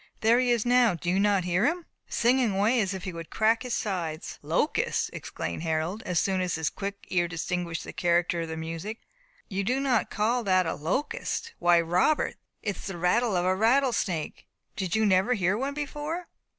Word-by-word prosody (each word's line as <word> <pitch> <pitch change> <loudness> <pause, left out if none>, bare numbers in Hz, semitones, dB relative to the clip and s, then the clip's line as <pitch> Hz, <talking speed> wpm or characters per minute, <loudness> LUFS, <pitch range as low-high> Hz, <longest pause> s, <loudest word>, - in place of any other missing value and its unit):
There 230 +2 +5
he 250 -1 +2
is 235 -2 +2
now 245 -5 +4
do 175 +2 -2
you 190 - +2
not 200 -2 +3
hear 180 +2 +1
him? 340 +2 -1 0.2
singing 240 -3 +2
away 220 +5 +3
as 195 -1 -1
if 190 - -7
he 185 - -4
would 165 -1 -8
crack 220 +1 +2
his 250 -2 -2
sides." 170 -6 -3
"Locust!" - - 0
exclaimed 85 - -5
Harold, 165 +5 -1
as 180 -1 +1
soon 190 -1 +1
as 180 -2 -1
his 160 -1 -1
quick 200 0 -6
ear 175 -1 +2
distinguished 170 0 -3
the - - -8
character 175 0 +1
of 165 - -3
the 160 0 -5
music, 165 +7 -5 0.5
"you 200 -1 -2
do 250 +6 +1
not 265 -4 +1
call 230 +3 0
that 185 -1 +3
a - - -1
locust. 295 - -2
Why, 175 0 +5
Robert, 180 - +1 0.3
it 205 -2 -2
is - - -8
the 195 -3 -5
rattle 200 +5 +2
of 175 - 0
a 185 0 +3
rattle 245 +5 +3
snake. 170 -7 -3 0.3
Did 190 -1 -2
you 220 0 +3
never 195 +4 +3
hear 190 -1 +1
one 270 +5 -2
before?" 295 +4 -4
195 Hz, 205 wpm, -27 LUFS, 175-240 Hz, 0.5 s, There